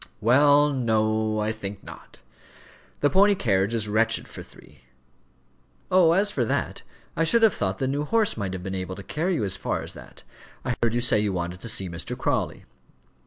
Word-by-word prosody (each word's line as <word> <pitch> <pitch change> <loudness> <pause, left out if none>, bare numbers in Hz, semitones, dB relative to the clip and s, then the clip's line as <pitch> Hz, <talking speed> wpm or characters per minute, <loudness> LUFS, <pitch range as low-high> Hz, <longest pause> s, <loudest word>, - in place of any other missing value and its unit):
"Well, 145 +6 +4
no; 110 -3 0
I 105 +1 0
think 105 -2 -7
not. - - -13 0.8
The 145 - +3
pony 200 +2 +5
carriage 100 - 0
is 110 -2 -1
wretched 110 +2 +1
for - - -10
three." 70 -1 -18 1.1
"Oh, 180 -3 +5
as 200 +3 +2
for 130 - -1
that, 115 - -2 0.3
I 165 - +1
should 230 +8 +3
have 220 -5 +5
thought 95 -1 -2
the 130 - -2
new 140 +3 -1
horse 220 +5 +1
might 100 -4 -4
have 90 -1 -6
been 95 +1 -5
able 95 0 -4
to 100 - -9
carry 170 - -2
you 130 - -1
as 100 -1 -1
far - - -3
as - - -6
that. - - -14 0.4
I 125 - 0
heard 115 -1 +1
you 120 - +1
say 120 -3 +3
you 105 -2 0
wanted 90 +1 -4
to 115 - -4
see 105 -4 0
Mr. 85 -1 -5
Crawley." - - -2
110 Hz, 200 wpm, -25 LUFS, 100-145 Hz, 1.1 s, pony